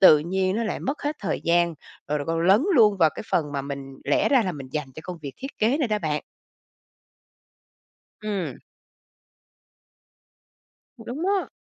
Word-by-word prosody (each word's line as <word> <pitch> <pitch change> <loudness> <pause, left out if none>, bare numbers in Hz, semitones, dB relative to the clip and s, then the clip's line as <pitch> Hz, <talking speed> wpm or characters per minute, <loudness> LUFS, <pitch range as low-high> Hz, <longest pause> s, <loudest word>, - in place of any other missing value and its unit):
tự 155 -5 +9
nhiên 185 +5 0
nó 230 - 0
lại - - -2
mất 285 +4 -3
hết 295 +1 -1
thời 195 - -2
gian, 170 0 +3 0.3
rồi 150 +1 +1
còn 165 0 0
lấn 190 +5 +5
luôn 215 -6 +6
vào 165 -4 +5
cái - - -6
phần 150 -4 +1
mà 140 -1 -2
mình 140 -1 -6
lẽ - - +3
ra 265 -5 +5
là 185 - -1
mình 140 -4 -8
dành 145 -4 -3
cho - - -7
công 180 +1 -7
việc 140 -2 -5
thiết 270 +1 -8
kế 240 +8 +3
này 270 - +1
đó 215 -1 +1
bạn. 150 -4 -1 2.0
Ừm. 205 -4 -3 2.4
Cũng 225 - -12
đúng 275 +9 -4
đó. 390 0 +1
185 Hz, 175 wpm, -25 LUFS, 155-225 Hz, 2.4 s, tự